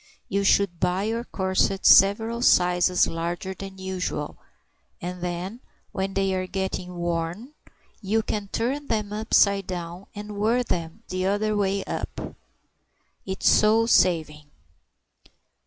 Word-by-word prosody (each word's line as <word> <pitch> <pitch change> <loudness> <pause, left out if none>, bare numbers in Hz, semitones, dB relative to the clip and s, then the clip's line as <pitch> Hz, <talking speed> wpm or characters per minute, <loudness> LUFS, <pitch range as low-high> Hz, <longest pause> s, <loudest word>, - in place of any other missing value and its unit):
You 200 +1 0
should 195 -3 +2
buy 180 +2 0
your 225 +2 -2
corsets 190 -1 +1
several 220 +4 +3
sizes 180 -3 +4
larger 175 +3 -4
than 195 0 -9
usual, 185 -5 -4 0.6
and 180 +1 -6
then 180 +5 -4 0.3
when 195 0 -3
they 195 -1 +1
are 185 0 -2
getting 185 -1 -4
worn, 175 - -3 0.5
you 220 +2 0
can 210 -1 -3
turn 265 +8 -2
them 210 -2 -1
upside 200 -2 +2
down 175 0 -6
and 210 0 -7
wear 230 +4 +2
them 165 -7 -4
the 185 0 -1
other 210 +2 0
way 200 -1 0
up. - - -5 0.9
It's 190 0 -1
so 220 +2 +5
saving." 155 -8 +2
190 Hz, 125 wpm, -25 LUFS, 180-210 Hz, 0.9 s, so